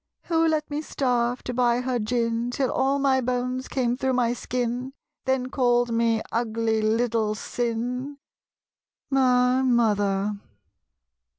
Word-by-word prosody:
Who 330 -1 +2
let 310 -2 0
me 295 +1 -2
starve, 245 -4 -1
to 250 - -4
buy 245 0 +2
her 250 -1 -1
gin, 230 +1 -1
Till 260 +1 -1
all 275 +1 +1
my 270 -2 +2
bones 250 +1 -2
came 245 -2 0
through 265 0 -1
my 240 -1 +2
skin, 245 +1 -3 0.3
Then 260 -1 0
called 245 -2 +2
me 230 -1 +1
"ugly 225 -1 0
little 220 -1 +1
sin?" 245 +5 -3 0.9
My 255 -1 +3
Mother. 205 -5 +1
245 Hz, 125 wpm, -25 LUFS, 230-260 Hz, 0.9 s, My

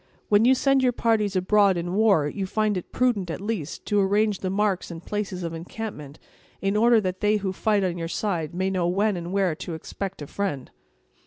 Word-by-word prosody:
"When 210 +2 +5
you 260 +2 +6
send 275 +1 +3
your 250 -1 +2
parties 215 -4 +1
abroad 195 0 +3
in 175 +1 -3
war, 200 -8 +3
you 190 +5 -3
find 215 +1 0
it 180 - -5
prudent, 230 -8 +1
at 160 - -4
least, 200 -7 -4
to 205 - +1
arrange 205 +1 +2
the 185 - -2
marks 195 -1 0
and 170 0 -9
places 200 -3 -3
of 165 -1 -4
encampment, 165 -4 -7 0.4
in 195 +1 0
order 230 +2 +5
that 185 -1 -3
they 210 +1 +2
who 195 -2 -3
fight 205 +1 +1
on 175 -2 -1
your 165 - -3
side 170 -4 -2
may 190 +1 0
know 180 -2 0
when 200 +3 +1
and 175 0 -5
where 195 -3 +1
to 165 - -5
expect 190 +1 -6
a - - -6
friend." 145 -6 -4
195 Hz, 215 wpm, -25 LUFS, 175-210 Hz, 0.4 s, you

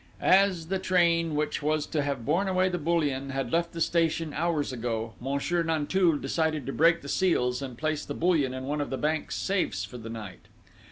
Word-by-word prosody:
As 185 -4 +3
the 190 0 0
train, 170 -4 +2
which 150 0 -1
was 155 0 0
to 155 - -1
have 140 -5 -3
borne 170 +7 +1
away 185 0 +2
the 180 -1 -2
bullion, 145 -4 0
had 135 -3 -3
left 170 0 +1
the 170 - -7
station 165 -2 +1
hours 155 -3 -1
ago, 115 -2 -3
Monsieur 140 +7 -1
Nanteuil 165 +1 +2
decided 155 +1 -1
to 135 - -4
break 165 0 +3
the - - -8
seals, 125 -8 +1
and 130 -3 -6
place 155 0 -1
the 145 - -6
bullion 160 -6 +2
in 130 0 -5
one 145 +2 -2
of 145 - -3
the 135 - -2
bank's 155 +2 -1
safes 195 -2 -1
for 125 - -10
the 115 0 -8
night. 110 -5 -8
155 Hz, 205 wpm, -28 LUFS, 135-170 Hz, -, As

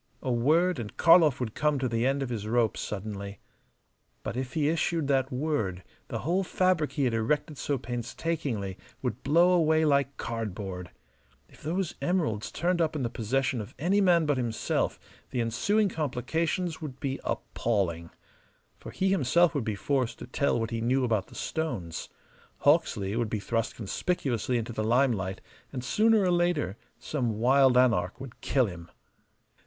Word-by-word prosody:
A 130 - 0
word, 155 +7 +3
and 110 -3 -7
Karlov 165 -5 +6
would 115 -4 -3
come 150 -1 +1
to 130 -1 0
the 115 +1 +1
end 135 +1 +1
of 130 - -4
his 110 -3 -4
rope 115 -1 +2
suddenly. 100 -1 -5 0.9
But - - -4
if 130 0 -4
he 150 -2 +1
issued 165 -1 0
that 135 -1 +2
word 125 - -1 0.2
the - - -4
whole 180 +4 +2
fabric 185 -4 +1
he 145 - 0
had 125 -3 +1
erected 145 +6 -1
so 145 - -1
painstakingly 120 - -3 0.2
would 125 -2 -2
blow 170 +6 +4
away 160 -2 +3
like 140 -2 +2
cardboard. 95 -5 -4 0.6
If - - -19
those 175 +3 -2
emeralds 155 - 0
turned 175 +2 0
up 160 -1 +1
in 145 - -1
the 120 - -2
possession 125 +2 0
of 105 - -10
any 185 +9 +2
man 175 -4 +4
but 145 -2 +1
himself 120 -3 -1 0.3
the 125 - -3
ensuing 200 - +2
complications 160 +3 -2
would 135 -4 -7
be 135 -1 -2
appalling. 85 -7 -1 0.7
For - - -9
he 190 - 0
himself 170 -1 +3
would 140 - -1
be 110 -2 -1
forced 130 +3 -1
to - - -8
tell 140 -4 0
what 115 +1 -2
he 115 -1 -2
knew 130 +3 +2
about 110 -5 0
the - - -15
stones: 120 - -3 0.5
Hawksley 100 +1 +2
would 115 -2 0
be 110 - -2
thrust 115 +2 -2
conspicuously 120 - -1
into 115 0 -4
the 110 - -2
limelight, 110 -5 +1 0.3
and 125 -3 -5
sooner 220 - +3
or 180 - +2
later 175 - +1 0.2
some 120 -8 -2
wild 130 +2 +5
anarch 115 -6 +2
would 130 -3 -10
kill 130 -2 +2
him. 85 -4 -8
130 Hz, 170 wpm, -28 LUFS, 115-160 Hz, 0.9 s, Karlov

